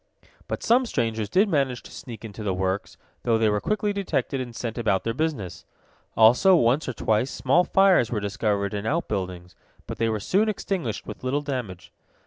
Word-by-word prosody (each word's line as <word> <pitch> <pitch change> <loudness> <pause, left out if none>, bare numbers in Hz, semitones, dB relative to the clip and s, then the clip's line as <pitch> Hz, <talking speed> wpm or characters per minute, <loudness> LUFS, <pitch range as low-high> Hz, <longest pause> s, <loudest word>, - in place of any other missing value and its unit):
But - - -4
some 245 +2 +3
strangers 115 - -1
did 195 +4 +3
manage 135 -8 0
to - - -13
sneak 115 -3 -9
into 110 0 -8
the 100 -3 -1
works, 95 +1 -2 0.2
though 115 -2 +2
they 110 -1 +3
were 105 -1 0
quickly 210 -1 0
detected 190 -8 -1
and 120 -2 -7
sent 115 0 -4
about 100 -5 +1
their 115 - -1
business. 135 - -3 0.5
Also, 125 - +6
once 130 0 +2
or - - -3
twice, 110 +3 0
small 140 +8 +2
fires 190 - +4
were 110 - -1
discovered 100 0 -1
in 105 +1 -3
outbuildings, 90 - -3 0.3
but - - -7
they 115 0 +2
were 110 -1 -1
soon 200 - +1
extinguished 185 - -3
with - - -9
little 135 +3 0
damage. 125 -11 -5
120 Hz, 185 wpm, -25 LUFS, 105-155 Hz, 0.5 s, Also